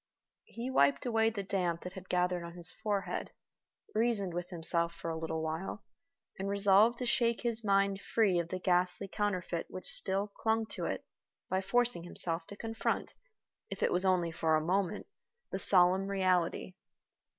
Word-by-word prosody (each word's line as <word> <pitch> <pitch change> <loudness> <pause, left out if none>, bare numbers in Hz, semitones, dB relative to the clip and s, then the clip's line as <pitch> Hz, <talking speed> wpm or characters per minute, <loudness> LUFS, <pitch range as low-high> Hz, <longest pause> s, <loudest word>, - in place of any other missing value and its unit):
He 240 +3 -6
wiped 140 - +3
away 225 -2 +2
the 210 -3 -5
damp 180 -3 -2
that 180 - -7
had 190 -1 -11
gathered 180 -1 0
on 170 0 -8
his 175 -1 -4
forehead, 205 -3 -3 0.6
reasoned 215 -5 0
with 175 0 -4
himself 170 -1 +2
for 165 - -5
a - - -3
little 160 0 -3
while, 160 +6 -4 0.6
and 195 +1 -2
resolved 200 +3 +4
to 250 - -3
shake 235 -1 +1
his 235 -2 +1
mind 195 -1 +2
free 200 -6 +2
of 170 -1 -3
the 185 - -3
ghastly 180 +1 +1
counterfeit 185 -4 -2
which 185 - -8
still 195 +2 -1
clung 220 +2 -1
to - - -3
it - - -3 0.5
by 190 0 +1
forcing 245 -2 +1
himself 165 -1 +2
to 205 - -8
confront, 225 0 -2 0.6
if - - -4
it - - +2
was 180 +1 +4
only 180 -3 +2
for 160 -1 +1
a 155 0 0
moment, 195 +3 0 0.5
the 190 - -3
solemn 190 0 +4
reality. 185 -2 0
190 Hz, 170 wpm, -32 LUFS, 175-210 Hz, 0.6 s, resolved